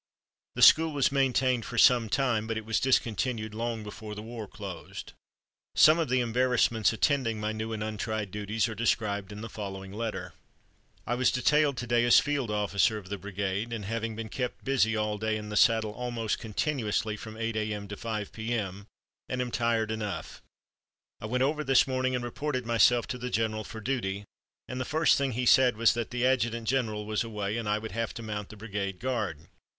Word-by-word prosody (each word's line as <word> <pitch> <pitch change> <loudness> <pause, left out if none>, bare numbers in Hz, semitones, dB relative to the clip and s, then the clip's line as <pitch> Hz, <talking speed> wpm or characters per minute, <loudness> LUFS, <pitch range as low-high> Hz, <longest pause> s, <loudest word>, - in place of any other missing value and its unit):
The - - +2
school 160 0 +7
was 140 -2 +2
maintained 130 -3 +2
for - - -6
some 120 -4 +5
time, 120 -3 +1
but 115 -1 -2
it 110 - -5
was 110 0 +1
discontinued 115 -3 0
long 115 0 -3
before 105 0 -8
the 105 - -7
war 115 -2 -7
closed. 95 -4 -8 0.6
Some 155 +2 +7
of 160 - 0
the 130 0 +2
embarrassments 120 -2 +2
attending 115 -2 +1
my 105 0 -1
new 110 +1 -4
and 110 -1 -3
untried 110 -1 -3
duties 105 +2 -1
are 115 - -4
described 105 -3 -1
in 105 +1 -8
the 115 - -5
following 95 -2 -7
letter: 100 -5 -4 0.7
"I 120 - -1
was 125 +1 +3
detailed 145 +2 +2
to 120 - -3
day 120 0 +2
as 120 - +7
field 145 -5 -1
officer 105 +1 +1
of 95 -3 -10
the 100 -1 -4
brigade, 100 +3 -3
and 110 -3 -4
have 115 +3 -2
been 115 0 -4
kept 125 +3 -4
busy 125 -5 +2
all 105 -1 -1
day, 110 0 0
in 105 0 -7
the 105 - -5
saddle 110 -2 +4
almost 120 -1 -3
continuously 110 -2 -1
from 110 0 -9
8 115 0 -2
A.M. 105 -1 -2
to 105 - -5
5 105 -2 -4
P.M., 105 -4 -3 0.4
and 125 - -2
am 125 -1 -2
tired 115 -2 +1
enough. 105 -3 -5 0.8
I 110 - -5
went 125 +3 +1
over 150 +3 0
this 135 -2 +4
morning 130 -1 0
and 125 - -2
reported 130 +1 -3
myself 120 +1 +4
to 125 - -4
the 125 +1 -4
general 110 -2 -1
for 110 - -8
duty, 100 -5 -2 0.4
and 125 0 -4
the - - +1
first 155 +4 +3
thing 135 -2 0
he 125 +2 -1
said 125 -2 +5
was 115 0 +5
that 120 -1 -3
the 125 0 -1
adjutant 120 -3 +1
general 110 -5 0
was 110 +2 -1
away 105 -2 -3
and 115 -3 -3
I 105 - +2
would 110 +1 -6
have 115 0 -3
to 115 - -6
mount 105 -2 -5
the 110 - -11
brigade 100 -3 -4
guard. 110 - -2
115 Hz, 200 wpm, -29 LUFS, 105-125 Hz, 0.8 s, school